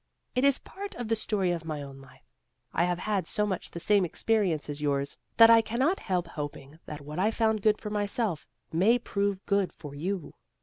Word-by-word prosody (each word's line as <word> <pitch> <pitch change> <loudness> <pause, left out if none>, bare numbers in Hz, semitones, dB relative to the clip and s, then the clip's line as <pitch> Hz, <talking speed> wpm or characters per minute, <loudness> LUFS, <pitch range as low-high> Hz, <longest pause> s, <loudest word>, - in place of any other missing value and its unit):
It 255 - +1
is 280 -1 +5
part 400 +1 -8
of 240 -2 -5
the 225 - +3
story 205 -4 0
of 170 -2 -2
my 155 -3 -4
own 135 -1 -10
life. 130 - -18 0.5
I 170 - +3
have 175 0 0
had 200 0 -1
so 210 - 0
much 190 -4 -3
the 170 - -7
same 200 +2 +3
experience 180 -2 0
as 145 0 -5
yours 140 -1 0 0.2
that 230 0 +9
I 230 0 +8
cannot 260 - 0
help 180 -2 -1
hoping 145 -1 -7
that 150 -1 -6
what 150 +3 -6
I 205 +3 +3
found 220 -1 +1
good 215 0 +3
for 210 - -6
myself, 205 - -1 0.2
may 200 +9 +4
prove 200 -4 -2
good 200 -2 +1
for 145 -3 -10
you." 180 +4 -3
195 Hz, 210 wpm, -28 LUFS, 155-220 Hz, 0.5 s, that